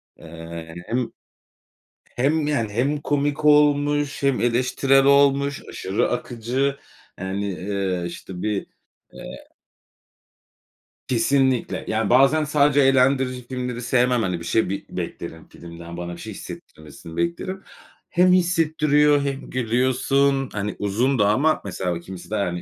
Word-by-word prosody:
Eee, - - -16 0.4
hani, 80 +1 -10
hem 120 +1 -1 1.0
hem, 145 +4 +1
yani, 115 -8 0
hem 135 +6 +1
komik 145 +1 -1
olmuş 145 -1 +3
hem 140 -2 +2
eleştirel 130 +3 +2
olmuş, 140 0 +3
aşırı 95 +2 -1
akıcı, 125 +3 -2 0.4
yani, 95 +2 -3
eee, 95 0 -2
işte, 90 +1 -8
bir, 105 -2 -2 0.5
eee - - -10 1.6
Kesinlikle. 130 +1 +1
Yani, 110 -1 0
bazen 135 +5 +5
sadece 145 -1 +3
eğlendirici 130 -2 +2
filmleri 125 -1 -4
sevmem. 125 -1 +2
Hani, 90 -4 -1
bir 85 - -9
şey 110 +2 +1
bir 100 - -4
beklerim 80 -1 -6
filmden, 85 0 -11
bana 85 0 -5
bir 85 - -9
şey - - -7
hissettirmesini 80 +2 -11
beklerim. 185 +3 -3 0.5
Hem 180 0 +4
hissettiriyor 155 -5 +3
hem 140 -1 -4
gülüyorsun, 130 +3 +1
hani, 105 0 -3
uzun 115 +6 0
da 105 0 +4
ama 150 +9 +2
mesela 90 -2 -3
o - - -5
kimisi 90 +2 -10
de, - - 0
hani, 90 -4 -1
130 Hz, 130 wpm, -23 LUFS, 100-140 Hz, 1.6 s, bazen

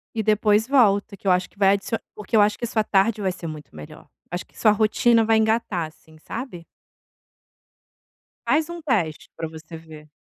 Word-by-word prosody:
E 220 - -1
depois 210 0 +3
volta, 210 -6 +2
que 195 - -8
eu - - +5
acho 180 0 +1
que 205 - -26
vai 195 0 +5
adicio 200 +3 -2 0.2
porque 210 +1 -1
eu - - +7
acho 205 0 +2
que - - -12
isso 235 - -2
sua 220 -2 +1
tarde 205 +2 +2
vai 190 -1 0
ser 170 -2 -8
muito 155 - -9
melhor. 75 -1 -12 0.2
Acho 175 - -4
que - - -25
sua 215 - +4
rotina 225 +2 +3
vai 225 0 +3
engatar, 220 -6 0
assim, 155 0 -20
sabe. 200 - -7 1.8
Faz 310 +2 +2
um 345 0 -6
teste 205 - -1
pra 165 - -4
você 160 +1 -11
ver. 155 -2 -12
205 Hz, 200 wpm, -23 LUFS, 170-225 Hz, 1.8 s, eu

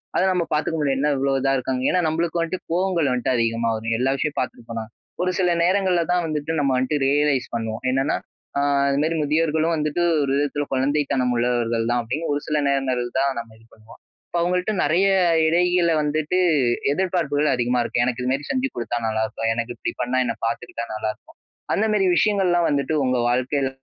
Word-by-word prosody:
அத - - +3
நம்ம 180 -2 0
பாத்துக்க 155 +2 0
முடியாது. 135 -2 +1
"என்ன 150 +1 +2
இவ்ளோ 135 +1 +1
இதா 135 0 +2
இருக்காங்க". 130 0 -2
ஏன்னா 180 - +2
நம்பளுக்கு 165 +2 -1
வந்துட்டு, 170 +2 -4
கோவங்கள் 175 -4 +1
வந்துட்டு 125 +1 0
அதிகமா 115 0 0
வரும். 115 +1 -2
எல்லா 130 +2 +2
விஷயம் 150 +1 -2
பாத்திருப்பனா. 115 -2 -4 0.4
ஒரு 185 - +1
சில 180 -2 +2
நேரங்கள்ல 185 -1 +2
தான் 180 -1 +1
வந்துட்டு 150 0 -3
நம்ம 140 -2 +1
வந்துட்டு 130 +4 0
ரியலைஸ் 145 -2 +2
பண்ணுவோம். 110 -1 -3
என்னன்னா, 135 +2 +1 0.4
"அ - - +2 0.3
அதுமாரி 150 +4 +1
முதியோர்களும் 160 +2 +1
வந்துட்டு 150 +2 -1 0.2
ஒரு 135 - -1
விதத்துல 145 0 -1
குழந்தைத்தனம் 135 -1 +1
உள்ளவர்கள் 120 -1 0
தான்", 120 0 +1
அப்பிடின்னு 145 +7 -3
ஒரு 145 - -2
சில 155 - 0
நேரங்கள் 135 -3 0 0.2
தான் 135 0 +1
நம்ம 115 -1 -9
இது 115 - -22
பண்ணுவோம். 110 +1 -17 0.3
இப்ப 175 - -2
அவுங்கள்ட்ட 180 +4 0
நிறைய 175 +7 +3 0.4
இடையில 175 +1 +3
வந்துட்டு, 155 +4 0 0.6
எதிர்ப்பார்ப்புகள் 155 -5 0
அதிகமா 125 0 0
இருக்கும். 120 +1 0
"எனக்கு 125 0 -2
இதுமாரி 135 +3 -1
செஞ்சு 265 0 0
குடுத்தா 120 0 -2
நல்லாருக்கும். 110 +1 -1
எனக்கு 115 +1 -3
இப்பிடி - - -4
பண்ணா, 125 +1 0
என்ன - - -2
பார்த்துக்கிட்டா 115 0 -4
நல்லாருக்கும்". 110 0 -6 0.4
அந்தமேரி 210 -2 +2
விஷயங்கள்லாம் 185 -5 +2
வந்துட்டு, 145 +2 0
உங்க 125 0 +1
வாழ்க்கையில 130 +2 0
145 Hz, 175 wpm, -22 LUFS, 125-165 Hz, 0.6 s, அத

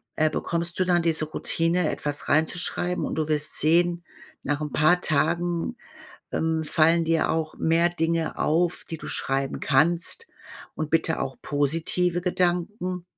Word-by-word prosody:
äh, 155 0 +2
bekommst 170 +3 -3
du 185 - +2
dann 175 -1 +2
diese 160 -2 0
Routine, 165 +2 0
etwas 145 0 -4
reinzuschreiben. 175 +3 0
Und - - -4
du 155 -1 -1
wirst 155 -1 -1
sehen: 170 +2 +2 0.4
Nach 145 +1 -2
'n 150 - -4
paar 175 +4 +3
Tagen, 170 - +2 0.6
ähm, 160 0 -1
fallen 165 +2 +3
dir 165 0 +1
auch 160 -1 -2
mehr 165 +2 +2
Dinge 165 -1 -1
auf, 170 +3 0
die 165 - -4
du - - -9
schreiben 135 0 -1
kannst, 170 - +1 0.5
und 155 -1 -4
bitte 160 0 +1
auch 130 -1 -5
positive 165 +5 -1
Gedanken. 180 +1 0
165 Hz, 145 wpm, -25 LUFS, 155-175 Hz, 0.6 s, paar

